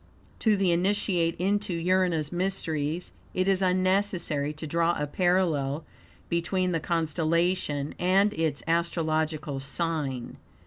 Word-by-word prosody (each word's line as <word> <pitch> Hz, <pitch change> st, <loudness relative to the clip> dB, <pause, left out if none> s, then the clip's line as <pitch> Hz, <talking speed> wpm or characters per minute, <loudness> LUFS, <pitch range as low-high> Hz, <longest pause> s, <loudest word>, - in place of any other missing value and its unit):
To 215 Hz, -3 st, +3 dB
the 190 Hz, -2 st, +2 dB
Initiate 175 Hz, -2 st, +1 dB
into 200 Hz, +1 st, 0 dB
Urania's 170 Hz, -3 st, +1 dB
mysteries 175 Hz, -3 st, -2 dB, 0.2 s
it 185 Hz, +1 st, +1 dB
is 195 Hz, -1 st, +2 dB
unnecessary 185 Hz, -5 st, +1 dB
to 155 Hz, +1 st, -6 dB
draw 170 Hz, +2 st, +1 dB
a 150 Hz, -, 0 dB
parallel 160 Hz, -3 st, +1 dB, 0.4 s
between 180 Hz, +2 st, 0 dB
the 165 Hz, -, 0 dB
constellation 165 Hz, -2 st, 0 dB
and 195 Hz, +3 st, +3 dB
its 160 Hz, -5 st, -1 dB
astrological 160 Hz, -3 st, 0 dB
sign. 135 Hz, -3 st, -3 dB
170 Hz, 115 wpm, -27 LUFS, 155-185 Hz, 0.4 s, To